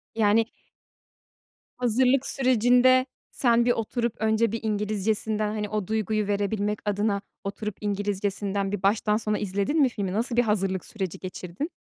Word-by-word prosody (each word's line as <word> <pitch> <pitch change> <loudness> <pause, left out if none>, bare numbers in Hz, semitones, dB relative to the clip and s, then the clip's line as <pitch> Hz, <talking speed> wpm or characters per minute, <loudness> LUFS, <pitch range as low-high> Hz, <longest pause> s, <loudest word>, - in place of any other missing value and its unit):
Yani 225 0 +3 1.3
Hazırlık 250 +2 +2
sürecinde 255 0 +4 0.3
sen 235 -2 +3
bir 245 - +4
oturup 235 0 -1
önce 220 0 +2
bir 230 - -2
İngilizcesinden 215 0 0
hani 210 -1 -3
o 210 -3 -2
duyguyu 215 -1 -1
verebilmek 205 +1 -1
adına 205 0 0 0.2
oturup 200 +1 -4
İngilizcesinden 200 -1 -2
bir 205 -2 -4
baştan 210 +1 +2
sona 215 -2 -1
izledin 205 +10 0
mi 265 - +5
filmi, 200 -6 -3
nasıl 230 +3 -1
bir 245 - +4
hazırlık 195 -4 0
süreci 190 -4 -5
geçirdin? 185 - -5
215 Hz, 135 wpm, -26 LUFS, 200-230 Hz, 1.3 s, mi